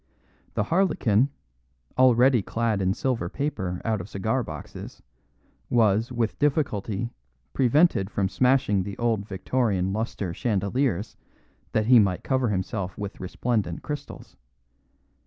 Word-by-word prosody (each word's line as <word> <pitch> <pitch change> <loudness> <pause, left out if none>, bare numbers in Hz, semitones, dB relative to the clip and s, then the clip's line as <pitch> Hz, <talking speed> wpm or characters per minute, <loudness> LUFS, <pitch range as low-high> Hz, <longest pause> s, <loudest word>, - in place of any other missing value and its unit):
The - - +1
harlequin, 140 - +2 0.7
already 125 -1 +5
clad 115 0 -1
in 95 +1 +1
silver 115 -9 -1
paper 95 -11 -3
out 110 -4 0
of 90 - -10
cigar 110 +7 -1
boxes, - - -9 0.7
was, 115 0 +3
with 115 -3 -1
difficulty, 120 -7 0 0.4
prevented 130 - +3
from 100 -2 0
smashing 125 -2 +2
the 100 +1 -6
old 115 -4 0
Victorian 95 -2 0
lustre 105 -4 -3
chandeliers, 105 +1 -1 0.6
that 110 - +2
he 125 +1 +7
might 100 -4 +1
cover 130 -3 +1
himself 95 -1 -3
with 100 -1 -6
resplendent 95 -2 -2
crystals. 150 -1 -7
110 Hz, 120 wpm, -26 LUFS, 100-125 Hz, 0.7 s, he